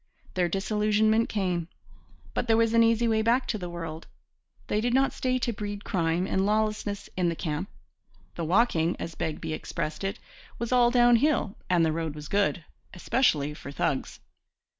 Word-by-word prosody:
Their 180 -2 +1
disillusionment 215 +3 +2
came; 180 -5 -1 0.7
but 245 - -2
there 225 -1 +4
was 230 0 +2
an 230 - +5
easy 230 +1 +3
way 220 -1 +2
back 240 +4 +2
to 215 - -1
the 180 -2 -5
world. 165 -2 -6 0.6
They 210 - 0
did 240 +2 +1
not 270 +1 +3
stay 255 0 0
to 240 -1 -1
breed 205 0 -5
crime 170 0 0
and 190 0 0
lawlessness 210 -1 -1
in 180 -2 +1
the 165 - -2
camp. 160 +4 -3 0.6
'The 170 - -4
walking' 175 -3 +2
as 165 - -5
Begbie 160 0 -3
expressed 155 +2 -4
it 195 0 -2 0.4
'was 235 +1 -4
all 245 -1 +5
down 240 -1 +5
hill 265 -6 +1
and 175 -2 +4
the 160 - +1
road 160 -1 -3
was 150 0 -8
good, 200 -4 +1 0.3
especially 155 - +1
for 140 -2 -9
thugs.' 140 -1 -2
200 Hz, 175 wpm, -27 LUFS, 165-230 Hz, 0.7 s, an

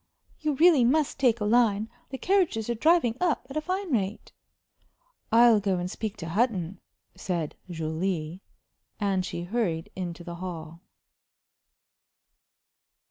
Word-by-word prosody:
You 305 -2 -1
really 320 -3 +6
must 285 +4 +2
take 240 -4 +3
a 210 - -1
line. 220 -2 +3 0.2
The 265 - -5
carriages 340 - +1
are - - +1
driving 250 -2 +3
up 340 -7 +1
at - - -8
a 310 - 0
fine 370 +2 -3
rate." 205 -4 -2 1.0
"I'll 230 -1 +6
go 195 -2 0
and 180 +1 -3
speak 215 -1 -4
to 165 -4 -6
Hutton," 195 -3 0 0.3
said 175 -5 -3
Julie. 165 +1 -3 0.6
And 195 -3 +1
she 175 -1 -5
hurried 175 -5 -2
into 175 -2 -5
the 170 0 -7
hall. 165 -2 -7
210 Hz, 135 wpm, -27 LUFS, 175-250 Hz, 1.0 s, really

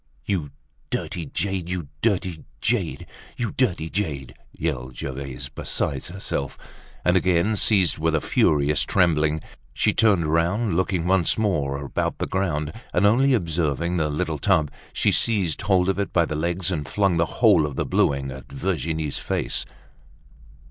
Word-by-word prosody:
"You 85 -5 -1 0.4
dirty 85 -4 -3
jade! 95 +2 -2
You 90 -5 -3
dirty 95 -7 0 0.2
jade! - - -1 0.3
You 120 -4 -2
dirty 95 -11 0
jade!" 80 -8 -3 0.2
yelled 65 -6 -3
Gervaise, 65 -1 -5
beside 70 -2 -3
herself, 85 -7 -4 0.5
and 90 - +4
again 90 +3 +2
seized 95 -6 +3
with 80 0 +1
a - - +3
furious 75 0 +2
trembling. 80 -2 +2 0.3
She - - +2
turned 100 -7 +3
round, 90 +5 +1
looking 90 -1 0
once 90 -2 +2
more 75 -11 0
about - - -2
the - - -1
ground; 75 -6 -1 0.2
and 90 - +3
only 130 +6 +4
observing 85 - 0
the 80 -2 +1
little 75 0 -2
tub, 75 +1 +2 0.2
she - - +2
seized 95 -9 +1
hold 95 -2 +2
of 95 0 0
it 100 - -1
by 85 -2 +3
the 75 - -4
legs, 85 +4 0
and 75 -5 -2
flung 100 -4 +2
the 85 - +3
whole 100 -10 +5
of 70 - -7
the - - -1
bluing 70 -1 +1
at 65 0 -10
Virginie's 80 -2 -2
face. - - -2
85 Hz, 155 wpm, -24 LUFS, 75-95 Hz, 0.5 s, whole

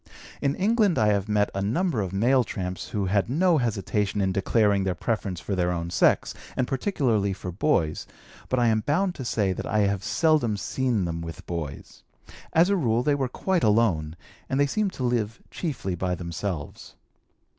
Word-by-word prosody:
In 140 0 +1
England 210 -2 +2
I 105 -1 +4
have 100 0 0
met 105 -1 +2
a 95 - -2
number 125 - 0
of 95 -3 -3
male 120 +7 +3
tramps 90 -5 -5
who 100 -2 -1
had 100 +3 +1
no 165 +4 +3
hesitation 105 -3 -1
in 95 -1 +1
declaring 100 +1 +2
their 95 -2 -1
preference 100 -4 -2
for 100 - -4
their 90 -1 +1
own 85 -1 -3
sex, - - +3 0.2
and 130 - +1
particularly 125 - 0
for 90 -1 -6
boys, 85 - 0 0.4
but 130 - +1
I 120 - +3
am 110 -1 +2
bound 170 - 0
to 135 - -7
say 105 -5 0
that - - -5
I 110 - +2
have 100 -1 0
seldom 155 -10 +2
seen 120 -3 -1
them 85 -1 -3
with 80 -1 -8
boys; 80 -5 -6 0.5
as 165 +2 +5
a - - +4
rule, 120 - +1
they 145 - +2
were 135 -3 -1
quite 185 +6 -1
alone, 100 -8 +2 0.3
and 135 - 0
they 145 - +5
seem 205 +8 0
to 135 - -6
live 120 -2 -1
chiefly 130 - -3
by 90 +1 -1
themselves. 85 -2 -5
105 Hz, 190 wpm, -26 LUFS, 95-135 Hz, 0.5 s, as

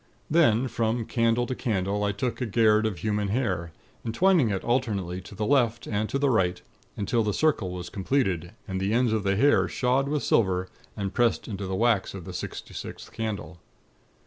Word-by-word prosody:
"Then, 130 -7 +4
from 115 0 -1
candle 115 +1 +1
to 130 - -3
candle 105 -5 -1
I 100 - +1
took 120 +6 -3
a 125 - 0
'gayrd' 110 0 +3
of 100 -5 -4
human 105 +2 -1
hair, 95 -7 -1 0.3
entwining 150 - +3
it 95 -2 -2
alternately 100 -8 -1
to 95 - -12
the 105 - -2
left 120 -3 +2
and 105 0 -1
to - - 0
the 140 -1 +2
right, 90 -6 +1 0.4
until 115 +3 +1
the 105 -2 0
circle 150 -12 +1
was 90 -1 -6
completed, 95 - -1
and 95 0 -3
the 100 +3 0
ends 120 -2 +2
of 110 - +1
the 100 0 +1
hair 140 +8 +4
shod 130 +2 +1
with 150 -1 -1
silver, 95 -4 +2 0.3
and 100 -2 -3
pressed 120 +1 +1
into 100 -3 -4
the 95 - -2
wax 110 -2 +1
of 90 -4 -8
the - - -7
sixty - - -6
sixth - - -8
candle. 100 -6 -5
110 Hz, 195 wpm, -26 LUFS, 95-120 Hz, 0.4 s, Then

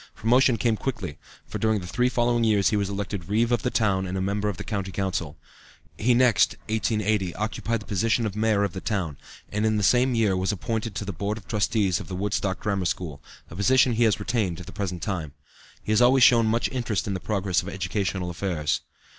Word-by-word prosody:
Promotion 125 +2 +3
came 110 0 +1
quickly, 120 - -4 0.3
for - - -6
during 110 -1 +2
the 90 - -8
three 125 +7 +1
following 120 -1 +1
years 105 -3 +3
he - - +1
was 100 -1 0
elected 100 -2 -4
Reeve 115 +3 +2
of 120 - +2
the 125 - 0
town 95 -5 +1
and 95 +1 -3
a - - -1
member 100 +2 -1
of 100 - -4
the - - -6
County 100 -4 -3
Council. 90 -6 -3 0.6
He 120 +3 +2
next 120 -6 +4
(1880) 105 -4 0
occupied 110 +1 -2
the - - -11
position 110 +4 +1
of 105 -2 -3
Mayor 105 -1 +2
of 100 - -1
the 95 - -6
town, 90 -9 -2 0.3
and 105 +1 -1
in 110 -1 +2
the 105 - 0
same 125 +4 +3
year 105 -4 +2
was 95 +2 0
appointed 110 +1 -3
to 105 - -3
the 100 - -4
Board 100 +5 -3
of 110 - -12
Trustees 105 -3 +1
of - - -8
the 95 - -5
Woodstock 100 0 -1
Grammar 100 -5 -1
School, 80 -4 -3 0.3
a - - -8
position 130 +6 +4
he 115 +1 +2
has 110 -2 +2
retained 100 -5 -1
to 90 - -8
the - - -10
present 90 -4 -4
time. 85 -9 -3 0.5
He - - -3
has 110 +2 +4
always 125 +1 +6
shown 115 -3 +6
much 115 +2 +1
interest 120 -5 -1
in 100 - -2
the 95 - -3
progress 95 -6 0
of 95 - -7
educational 95 -1 -2
affairs. 85 -4 -1
105 Hz, 225 wpm, -25 LUFS, 95-115 Hz, 0.6 s, always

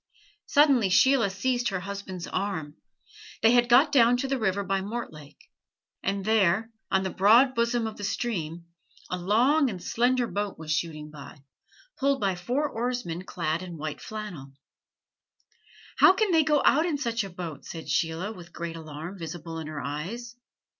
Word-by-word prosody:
Suddenly 275 -8 +4
Sheila 240 +2 +4
seized 240 +5 0
her 190 -2 -3
husband's 190 -2 -6
arm. 160 -7 -3 0.7
They 225 - +7
had 240 0 +4
got 270 +5 +6
down 245 -3 +5
to 270 - -2
the 270 -1 -1
river 200 -2 0
by 195 0 -1
Mortlake; 190 -9 -7 0.5
and 195 0 -2
there, 220 0 +2 0.2
on 190 -1 +2
the 190 - -2
broad 235 +7 +5
bosom 235 -1 +1
of 220 -1 -5
the 205 - -8
stream, 175 -7 -3 0.5
a 180 - -1
long 250 - +3
and 190 -5 -5
slender 245 +6 +1
boat 205 -3 -3
was 155 -1 -6
shooting 155 -1 -2
by, 145 -1 -12 0.6
pulled 275 0 +2
by 195 -2 +1
four 245 +12 -1
oarsmen 235 - -3
clad 165 -2 -2
in 175 -2 -8
white 155 -1 -5
flannel. 195 -11 -7 1.4
"How 375 - +7
can 415 0 +1
they 325 -2 +5
go 300 -2 +2
out 310 +5 +4
in 310 -4 0
such 235 -5 -1
a 195 - -6
boat?" 175 -4 -7
said 165 -1 -8
Sheila, 165 +4 -1
with 175 -5 -12
great 170 -1 -5
alarm 160 +4 -8
visible 165 0 -6
in 160 - -6
her 155 -2 -5
eyes. 195 - -5
200 Hz, 165 wpm, -27 LUFS, 170-240 Hz, 1.4 s, They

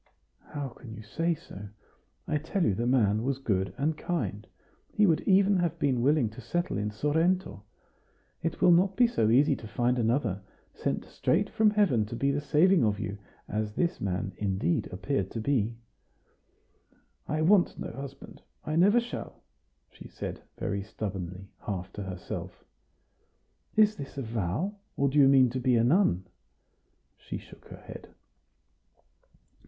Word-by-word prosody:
"How 145 -2 -5
can 115 -2 -11
you 110 - -9
say 165 +10 -1
so? 105 - -10 0.6
I 150 - 0
tell 165 +5 -1
you 100 - +3
the 120 +5 -1
man 110 -5 +3
was 135 +2 -1
good 95 -8 -1
and 150 +3 0
kind; 110 - -3 0.4
he 210 - +3
would 165 -5 +3
even 195 0 +5
have 175 -3 0
been 130 -4 +1
willing 140 -1 +3
to 115 - -10
settle 175 - -2
in 105 +1 -1
Sorrento. 160 - 0 0.8
It 165 - -3
will 180 - +7
not 185 +3 +4
be 245 - +5
so 115 - +1
easy 140 +4 +4
to 110 - -9
find 120 +3 0
another, 115 -4 0 0.3
sent - - -2
straight 200 +5 0
from 220 -1 +4
heaven 180 - +2
to 115 - -6
be 140 +3 +1
the 145 +1 -1
saving 160 +3 +4
of 105 -2 +1
you, 100 -1 -4 0.3
as 105 0 -2
this 170 +7 -1
man, 95 0 -2
indeed, 95 -4 0
appeared 100 +1 -2
to 115 - -5
be." 115 -2 0 1.5
"I 155 +1 0
want 185 +2 +4
no - - -5
husband 135 +2 -9 0.2
I 155 +1 -1
never 205 +7 +5
shall," 240 +1 -7 0.5
she - - -12
said, - - -6 0.2
very 100 -1 -2
stubbornly, 95 -3 -6 0.2
half 95 -3 -4
to 105 - -6
herself. 95 -2 -7 1.1
"Is 215 -1 +4
this 140 0 -8
a 135 - -2
vow? 115 - -2 0.2
or 140 0 +2
do 145 +2 +2
you 135 - +7
mean 130 -3 +5
to 130 - -2
be 125 0 +2
a 115 - +4
nun?" 120 - +3 0.9
She - - -6
shook - - -15
her - - -10
head. - - -11
130 Hz, 160 wpm, -29 LUFS, 105-165 Hz, 1.5 s, will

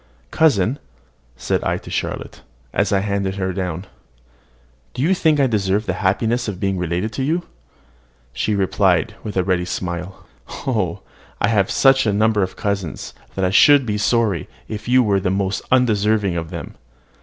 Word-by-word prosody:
"Cousin," 130 - +2 0.6
said - - -1
I - - 0
to - - -11
Charlotte, - - -4 0.3
as - - +1
I 100 -1 +2
handed 100 -1 -1
her 95 -1 -2
down, 90 -1 -3 1.1
"do 130 - -1
you 175 +5 +3
think 160 -5 +2
I 140 - +4
deserve 105 -3 0
the - - -1
happiness 115 +5 +1
of 100 -4 -4
being 95 -2 -1
related 90 +5 -2
to 130 - -2
you?" 165 +5 0 0.9
She 105 - -1
replied, 95 -2 +2
with 105 -3 -5
a 95 - +3
ready 90 -1 +1
smile, 90 0 -5 0.4
"Oh! 105 -10 -1 0.4
I - - +2
have 100 -4 +2
such 135 -3 +4
a 105 - +2
number 110 0 +2
of 95 -1 -2
cousins, 100 -5 -3 0.2
that 95 - 0
I 90 - +1
should 140 +5 +6
be 105 -2 -2
sorry 105 -5 +1 0.2
if 110 0 -6
you 125 +1 +5
were 100 -3 +2
the 95 -1 -1
most 95 +1 -1
undeserving 105 -6 +2
of 85 -1 -3
them." - - -7
100 Hz, 170 wpm, -20 LUFS, 95-115 Hz, 1.1 s, should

